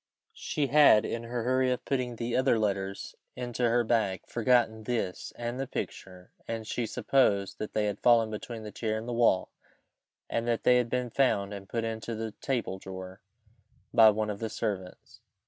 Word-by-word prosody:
She 150 - -2
had, 140 -6 +6
in 115 0 -4
her 120 0 -3
hurry 130 +1 +2
of 125 - -2
putting 125 -3 -1
the 115 +1 -3
other 130 -2 +3
letters 100 -2 -2 0.2
into 120 -1 -1
her 120 +1 +3
bag, 110 -5 0
forgotten 115 -2 +1
this 110 -7 -3
and 120 +2 -4
the 135 - -2
picture, 90 -5 -7 0.2
and 115 -1 -4
she 115 +1 -2
supposed 110 -5 +1
that 110 - -5
they 105 - +2
had 105 -1 -2
fallen 115 -2 +4
between 110 +1 -6
the 105 - -7
chair 110 +1 -2
and 110 +2 -6
the 120 - -3
wall, 115 -6 +2 0.8
and 115 +1 -2
that 115 -1 0
they 125 - +5
had 120 -1 0
been 125 -1 -2
found 105 -7 +1
and 100 -1 -9
put 115 -1 -2
into 115 0 -4
the 110 0 -4
table 120 -8 -2
drawer 95 +1 -9 0.7
by 115 -2 +8
one 105 0 0
of 100 - -6
the 110 - -3
servants. 95 -5 -5
115 Hz, 185 wpm, -29 LUFS, 105-120 Hz, 0.8 s, by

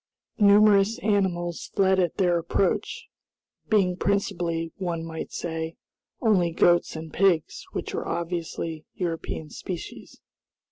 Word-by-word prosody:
Numerous 205 +1 +5
animals 180 -5 0
fled 190 -1 +3
at 175 -3 +1
their 175 -3 +3
approach, 175 +3 -1 0.6
being 195 -4 +3
principally, 175 -4 -1
one 170 -3 -3
might 160 -1 -6
say, 160 -1 -4 0.5
only 195 -7 +3
goats 175 +1 +3
and 160 -1 -7
pigs, 180 -5 +1
which - - -4
were - - -3
obviously 165 -2 -3
European 165 -3 -4
species. 180 -3 -7
175 Hz, 110 wpm, -26 LUFS, 165-195 Hz, 0.6 s, Numerous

